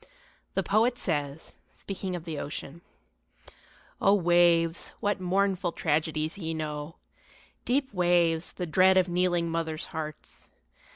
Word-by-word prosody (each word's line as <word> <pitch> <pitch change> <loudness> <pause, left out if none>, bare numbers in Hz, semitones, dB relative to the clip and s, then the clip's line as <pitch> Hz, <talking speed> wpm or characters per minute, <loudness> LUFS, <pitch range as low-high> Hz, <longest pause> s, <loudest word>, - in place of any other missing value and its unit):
The 195 - +1
poet 225 +6 +2
says, 145 - -3 0.2
speaking 190 -2 -5
of 175 - -6
the 160 -3 -4
ocean, 145 +2 -6 1.2
O 195 - +5
waves, 175 -2 +3
what 205 -1 -1
mournful 185 -1 0
tragedies 155 +2 -1
ye 165 -2 -3
know 150 0 -5 0.7
Deep 260 -1 0
waves, 175 -2 +2
the 180 - -4
dread 185 +3 +4
of 185 -1 +4
kneeling 175 -1 +1
mothers' 160 0 -2
hearts! 155 -2 -7
175 Hz, 120 wpm, -28 LUFS, 160-190 Hz, 1.2 s, O